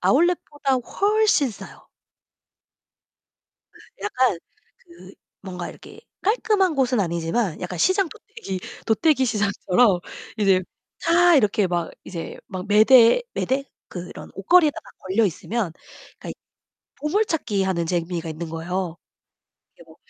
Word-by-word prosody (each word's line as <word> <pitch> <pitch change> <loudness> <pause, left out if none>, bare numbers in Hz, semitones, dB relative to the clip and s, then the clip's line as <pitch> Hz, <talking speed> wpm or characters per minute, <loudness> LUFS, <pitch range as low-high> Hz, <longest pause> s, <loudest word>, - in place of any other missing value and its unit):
아울렛보다 295 -3 +1
훨씬 400 - +1
싸요. 205 - -12 1.9
그 - - -19 0.3
약간 255 - +1 0.4
그 180 +3 -16 0.3
뭔가 180 -3 -6
이렇게 - - -13 0.2
깔끔한 405 -4 +2
곳은 255 -4 +1
아니지만 170 +1 -1
약간 180 -1 -5
시장 375 - +2
도떼기 195 - -8 0.3
도떼기시장처럼 225 - +2 0.4
이제 195 -3 +4 0.4
다 345 0 +5
이렇게 210 -5 +2
막 175 -2 -2
이제 170 -3 -7
막 185 -1 -6
매대, 230 - +6
매대 270 +1 -1 0.2
그런 180 0 -9
옷걸이에다가 305 - +2
걸려 195 +5 +1
있으면 200 0 -2 0.5
그러니까 - - -10
이 - - -6 0.7
보물찾기하는 230 - 0
재미가 170 -1 -2
있는 160 +1 -6
거예요. 175 +1 -3 0.8
이게 - - -17
뭐 - - -18
210 Hz, 270 characters per minute, -23 LUFS, 180-300 Hz, 1.9 s, 매대